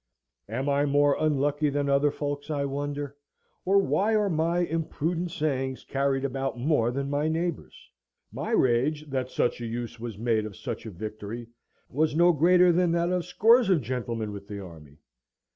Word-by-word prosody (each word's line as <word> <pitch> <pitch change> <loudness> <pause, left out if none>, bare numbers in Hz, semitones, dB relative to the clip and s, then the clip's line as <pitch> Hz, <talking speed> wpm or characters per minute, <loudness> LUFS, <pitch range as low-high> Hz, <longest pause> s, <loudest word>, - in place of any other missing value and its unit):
Am 130 +6 -2
I 140 +1 +2
more 145 0 +3
unlucky 145 0 +1
than 145 0 -1
other 140 +1 +3
folks, 145 0 -4
I 145 -2 -1
wonder? 145 0 -4 0.5
or 195 +2 +4
why 200 +2 +2
are 210 -2 +2
my 165 +2 +1
imprudent 165 +1 -2
sayings 135 -6 -2
carried 135 0 0
about 135 -1 -2
more 120 -2 +2
than 135 +3 -2
my 145 +2 0
neighbours'? 165 +1 -3 0.4
My - - -5
rage 140 +5 +2
that 130 -1 -2
such 120 - 0
a 120 - -3
use 115 0 -5
was 115 -3 -6
made 110 -1 0
of 100 - -10
such - - -6
a - - -4
victory 110 +4 -7 0.4
was 150 +3 0
no 175 +2 +6
greater 175 +3 +5
than 175 0 +2
that 170 +1 +1
of 180 -1 0
scores 225 +5 +4
of 180 -6 +3
gentlemen 115 -3 -3
with 100 -1 -9
the 100 -1 -6
army. 80 -6 -12
140 Hz, 175 wpm, -27 LUFS, 120-165 Hz, 0.5 s, no